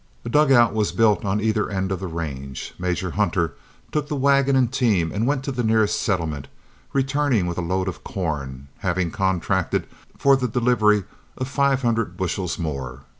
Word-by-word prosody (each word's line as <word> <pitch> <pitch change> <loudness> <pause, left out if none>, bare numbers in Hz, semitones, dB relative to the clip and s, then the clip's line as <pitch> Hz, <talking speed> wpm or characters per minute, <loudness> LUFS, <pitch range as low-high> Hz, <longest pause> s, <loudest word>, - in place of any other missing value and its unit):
A - - -3
dugout 135 -5 +5
was 105 -2 0
built 110 -2 +3
on 100 +1 0
either 110 -1 0
end 95 -1 -2
of 95 - -1
the 95 - -4
range. 70 -6 -5
Major 90 0 -1
Hunter 85 -6 0 0.4
took 150 -1 -1
the 150 - -2
wagon 140 0 +3
and 130 -2 +2
team 105 -11 +2
and 110 +4 -1
went 135 -1 0
to 140 - -3
the 125 -2 -2
nearest 110 -1 +2
settlement, 80 -8 -1 0.4
returning 135 -6 +1
with 85 0 -3
a - - 0
load 95 +2 -1
of 95 - -5
corn, 70 -7 -4
having 95 -3 -1
contracted 95 -3 0 0.3
for 140 -1 +5
the 130 -1 0
delivery 110 -3 +3 0.3
of 130 - -3
five 140 -1 +1
hundred 115 -6 0
bushels 95 -1 -2
more. 70 -5 -4
105 Hz, 175 wpm, -23 LUFS, 85-125 Hz, 0.4 s, dugout